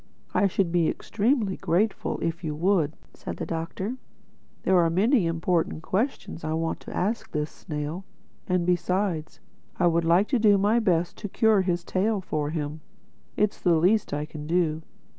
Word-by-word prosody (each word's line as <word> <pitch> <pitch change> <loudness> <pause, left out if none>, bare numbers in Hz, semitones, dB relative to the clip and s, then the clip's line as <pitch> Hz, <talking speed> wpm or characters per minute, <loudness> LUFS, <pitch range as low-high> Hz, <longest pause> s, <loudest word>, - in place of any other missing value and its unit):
"I 200 - +4
should 185 -2 0
be 170 -2 +3
extremely 220 -3 0
grateful 200 +5 0
to - - -6
you - - +2
if 165 +2 -4
you 155 -2 -2
would," 165 -2 +1 0.2
said - - -7
the - - -4
Doctor. 170 +8 -4 0.7
"There 185 -1 +4
are 165 -1 +4
many 200 - +3
important 165 -1 0
questions 205 - -2
I 155 0 -2
want 165 0 -1
to - - -8
ask 215 +5 -1
this 150 0 -2
snail—And 175 +3 -5
besides, 180 -1 -1 0.4
I 180 - +2
would 170 0 +3
like 175 +5 +4
to 255 - +2
do 210 -2 +5
my 210 +4 +3
best 175 -6 +1
to 205 - -5
cure 220 0 +3
his 175 -2 -1
tail 200 +4 0
for 155 -5 -2
him. 150 -1 -4 0.6
It's 210 -1 +1
the 175 -2 +4
least 190 +7 +2
I 145 +1 -2
can 150 -1 -8
do. 165 -2 +1
175 Hz, 175 wpm, -26 LUFS, 165-200 Hz, 0.7 s, do